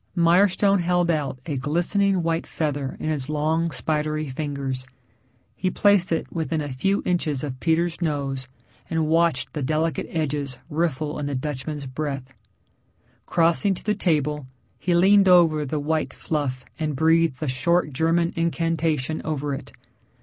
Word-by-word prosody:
Mirestone 190 Hz, +3 st, +4 dB
held 175 Hz, 0 st, +2 dB
out 145 Hz, -5 st, -1 dB
a 150 Hz, -4 st, -2 dB
glistening 175 Hz, +6 st, +1 dB
white 165 Hz, 0 st, -1 dB
feather 145 Hz, -4 st, -2 dB
in 155 Hz, -, -2 dB
his 145 Hz, -3 st, -2 dB
long 155 Hz, +2 st, +1 dB
spidery 155 Hz, -1 st, -1 dB
fingers. 135 Hz, -2 st, -4 dB, 0.7 s
He 185 Hz, -, -1 dB
placed 200 Hz, -1 st, +3 dB
it 165 Hz, -, -2 dB
within 160 Hz, -1 st, -1 dB
a 145 Hz, -3 st, -4 dB
few 195 Hz, +10 st, 0 dB
inches 155 Hz, -6 st, 0 dB
of 130 Hz, -3 st, -5 dB
Peter's 170 Hz, +2 st, +1 dB
nose 140 Hz, -5 st, -2 dB, 0.4 s
and 160 Hz, -1 st, 0 dB
watched 165 Hz, +1 st, +2 dB
the 150 Hz, -, -3 dB
delicate 155 Hz, +4 st, 0 dB
edges 145 Hz, -4 st, -2 dB
riffle 155 Hz, -2 st, -1 dB
in 145 Hz, -, -2 dB
the 145 Hz, -, -2 dB
Dutchman's 145 Hz, +1 st, -4 dB
breath. 135 Hz, -1 st, -4 dB, 0.9 s
Crossing 170 Hz, +4 st, +2 dB
to -, -, -11 dB
the 210 Hz, -, +1 dB
table, 150 Hz, -7 st, 0 dB, 0.3 s
he 175 Hz, -1 st, +1 dB
leaned 195 Hz, +2 st, +5 dB
over 160 Hz, -5 st, +5 dB
the 150 Hz, +3 st, -2 dB
white 155 Hz, +2 st, -1 dB
fluff 140 Hz, -5 st, -3 dB
and 155 Hz, -2 st, -1 dB
breathed 160 Hz, -1 st, +3 dB
the 155 Hz, -, -3 dB
short 150 Hz, +4 st, +1 dB
German 165 Hz, +4 st, +1 dB
incantation 165 Hz, -3 st, 0 dB
over 145 Hz, -2 st, -2 dB
it. 135 Hz, -1 st, -7 dB
155 Hz, 150 wpm, -24 LUFS, 145-170 Hz, 0.9 s, leaned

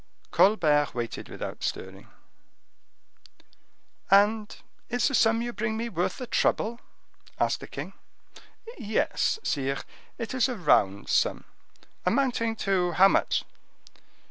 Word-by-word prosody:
Colbert 155 Hz, -9 st, +3 dB
waited 120 Hz, -1 st, -5 dB
without -, -, -7 dB
stirring. 95 Hz, +1 st, -5 dB, 2.0 s
"And 210 Hz, +2 st, +3 dB, 0.3 s
is 245 Hz, +1 st, +1 dB
the 280 Hz, -, -2 dB
sum 225 Hz, -1 st, +3 dB
you 240 Hz, 0 st, -4 dB
bring 220 Hz, 0 st, -2 dB
me 235 Hz, +1 st, -3 dB
worth 175 Hz, -4 st, -2 dB
the 255 Hz, -, -5 dB
trouble?" 235 Hz, 0 st, 0 dB, 0.6 s
asked -, -, +1 dB
the -, -, -9 dB
king. -, -, -7 dB, 0.9 s
"Yes, 215 Hz, -, 0 dB
sire, 135 Hz, -1 st, -1 dB, 0.4 s
it 230 Hz, 0 st, -5 dB
is 260 Hz, 0 st, +2 dB
a 250 Hz, -, -3 dB
round 100 Hz, -, +2 dB
sum." -, -, +1 dB, 0.6 s
"Amounting 230 Hz, +1 st, +1 dB
to 185 Hz, -4 st, 0 dB
how 190 Hz, +4 st, +6 dB
much?" -, -, +1 dB
210 Hz, 115 wpm, -27 LUFS, 170-235 Hz, 2.0 s, how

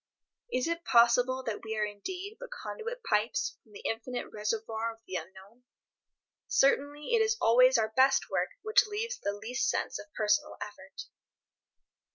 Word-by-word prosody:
Is 255 Hz, +3 st, 0 dB
it 335 Hz, 0 st, -2 dB
possible 245 Hz, 0 st, +4 dB
that 225 Hz, -4 st, -4 dB
we 220 Hz, -1 st, -4 dB
are 210 Hz, -, +2 dB
indeed 365 Hz, -, -6 dB
but -, -, -8 dB
conduit 485 Hz, 0 st, -6 dB
pipes 210 Hz, +2 st, 0 dB
from 220 Hz, -, -25 dB
the -, -, -11 dB
infinite 245 Hz, +2 st, -3 dB
reservoir 220 Hz, +1 st, -2 dB
of 225 Hz, 0 st, -16 dB
the 185 Hz, -, -10 dB
unknown? 190 Hz, +7 st, -8 dB, 0.9 s
Certainly 285 Hz, -, +2 dB
it 460 Hz, -, +5 dB
is 445 Hz, +1 st, +2 dB
always 255 Hz, +3 st, +6 dB
our 220 Hz, -1 st, +1 dB
best 270 Hz, +1 st, +4 dB
work -, -, 0 dB
which 435 Hz, 0 st, +4 dB
leaves 455 Hz, +4 st, -3 dB
the 200 Hz, -, -1 dB
least 225 Hz, +5 st, -2 dB
sense -, -, -1 dB
of 205 Hz, -, -11 dB
personal 210 Hz, -1 st, +1 dB
effort. -, -, -8 dB
245 Hz, 160 wpm, -30 LUFS, 220-335 Hz, 0.9 s, always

